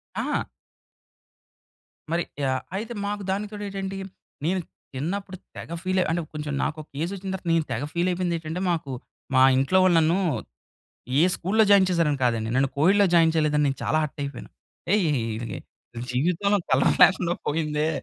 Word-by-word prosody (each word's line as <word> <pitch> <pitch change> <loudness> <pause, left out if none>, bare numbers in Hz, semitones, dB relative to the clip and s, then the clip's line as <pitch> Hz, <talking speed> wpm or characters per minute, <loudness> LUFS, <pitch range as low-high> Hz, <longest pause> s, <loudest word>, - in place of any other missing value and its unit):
ఆ! - - -1 1.7
మరి 170 +1 +1 0.2
యాహ్! 130 -1 0
అయితే 220 +4 -4
మాకు 205 0 -3
దానికి 205 +2 -2
తొడేంటంటే, 195 -2 -5 0.5
నేను 185 +3 +1 0.4
చిన్నప్పుడు 185 +7 -4 0.2
తెగ - - -8
ఫీల్ 185 0 +1
అంటే 170 +1 0
కొంచెం 150 -1 -4
నాకొక 155 -1 -4
ఏజ్ 170 +4 -1
వచ్చిన 195 0 -6
తర్వాత 185 -2 -6
నేను 165 -2 +2
తెగ 115 +4 -2
ఫీల్ 175 +1 +1
అయిపోయిందేంటంటే, 170 -1 -2
మాకు 160 -5 -2 0.4
మా 130 - +6 0.2
ఇంట్లో 135 +8 +2
వాళ్ళు 185 -2 +4
నన్ను 165 +3 +3 1.0
ఏ - - +6
స్కూల్లో 215 +5 +2
జాయిన్ 195 -2 +7
చేశారని 165 -5 +1
కాదండి. 115 -2 0
నన్ను 135 0 +3
కొఎడ్‌లో 195 +7 +4
జాయిన్ 165 -1 +5
చేయలేదని 150 -2 +2
నేను 135 -1 0
చాలా - - +1
హర్ట్ 150 -1 -5
అయిపోయాను. 140 -3 -7 0.4
ఏయ్, 200 -6 +3 1.0
జీవితంలో 180 +10 +1
కలర్ 130 0 +4
లేకుండా 180 -2 +5
పోయిందే 150 0 0
170 Hz, 145 wpm, -25 LUFS, 150-190 Hz, 1.7 s, జాయిన్